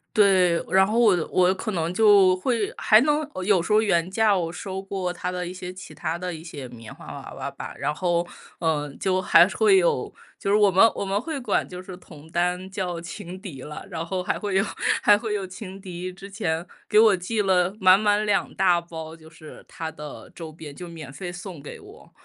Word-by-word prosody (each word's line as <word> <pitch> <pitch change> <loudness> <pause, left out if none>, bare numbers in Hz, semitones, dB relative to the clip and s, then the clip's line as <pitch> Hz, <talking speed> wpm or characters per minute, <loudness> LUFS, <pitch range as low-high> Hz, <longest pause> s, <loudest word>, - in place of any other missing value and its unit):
对， 185 -5 +4
然 190 0 +5
后 215 +3 -1
我 220 -6 +5 0.2
我 185 0 +4
可 215 +3 -4
能 170 -2 -2
就 200 -2 +6
会 220 +1 -1
还 215 - +6
能 295 +2 +1 0.2
有 195 -3 +4
时 170 - -5
候 210 - +6
原 175 -5 +1
价 210 +1 +3
我 165 -2 -2
收 190 +2 -6
过 190 -2 -3
他 180 0 -4
的 180 0 -3
一 175 - -6
些 180 -1 -7
其 185 +1 -11
它 165 -1 -3
的 180 0 -4
一 160 0 -9
些 145 -6 -8
棉 115 -3 -11
花 - - -14
娃 - - -9
娃 - - -5
吧。 - - -8
然 145 - -1
后， 175 +1 0 0.3
呃， 150 -3 -1
就 185 -1 +1
还 - - +6
会 420 -3 +4
有 465 +3 +1 0.3
就 - - -3
是 205 - +4
我 205 -2 +5
们 190 +3 +5
我 - - -3
们 195 +1 0
会 310 +2 -4
管 255 - 0
就 180 0 -8
是 185 0 -9
同 160 -4 -15
担 180 +2 -1
叫 180 -3 -3
情 180 +1 -8
敌 175 - -9
了， 150 +6 -8
然 165 -2 -3
后 180 +2 -3
还 - - -2
会 205 -2 -3
有 195 - +3 0.4
还 205 - +7
会 215 0 -3
有 195 -2 -3
情 190 +1 -9
敌 185 -1 -6
之 195 +2 -11
前 170 -5 -2 0.2
给 210 - +3
我 220 -2 +6
寄 200 +5 -2
了 185 0 +2
满 185 0 +6
满 210 0 +2
两 205 -2 +1
大 180 -3 +3
包， 160 -1 -8
就 160 -1 -16
是 155 -1 -13
他 160 -1 -6
的 150 -2 -10
周 165 -2 -8
边， 155 -2 -10
就 180 - -8
免 160 -5 -9
费 175 +3 -6
送 175 -3 -8
给 145 - -9
我。 - - -16
185 Hz, 240 characters per minute, -24 LUFS, 170-200 Hz, 0.4 s, 还